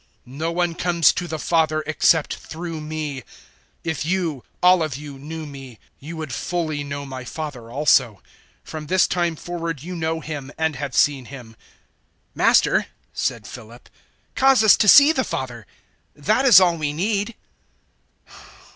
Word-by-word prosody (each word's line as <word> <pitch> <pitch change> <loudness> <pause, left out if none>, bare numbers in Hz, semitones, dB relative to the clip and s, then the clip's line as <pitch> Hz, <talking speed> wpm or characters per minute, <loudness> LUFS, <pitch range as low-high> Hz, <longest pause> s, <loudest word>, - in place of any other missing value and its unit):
No 150 +6 -4
one 175 0 0
comes 170 -2 +3
to 175 - -4
the 160 -1 -4
Father 155 -1 +1
except 160 0 +2
through 165 -1 -7
me. 150 -2 -5
014:007 - - -14 0.6
If 160 -3 -3
you 165 -5 -2 0.2
all 180 -1 +6
of 155 -5 -2
you 145 -2 -10
knew 155 +3 -7
me, 135 -5 -11 0.2
you 160 +4 -8
would 155 -5 -6
fully 155 0 -3
know 140 0 -6
my 130 -2 -7
Father 130 -4 -7
also. 120 -5 +2 0.4
From 155 -1 -8
this 185 +3 +3
time 175 -2 -1
forward 165 -3 -5
you 180 +2 -6
know 160 -1 -2
Him 150 -3 -7
and 160 -2 0
have 140 0 -5
seen 140 -3 +2
Him." 125 -3 -10
014:008 - - -21 0.8
"Master," - - +3 0.3
said 120 -5 -2
Philip, 120 0 -12 0.4
"cause 265 -3 +4
us 215 - +7
to 210 - +2
see 285 +8 +9
the 260 -5 0
Father: 120 - -5 0.5
that 215 - +1
is 235 -9 +9
all 175 -3 +3
we 150 -2 -2
need." 205 +6 -1
155 Hz, 160 wpm, -22 LUFS, 140-175 Hz, 0.8 s, see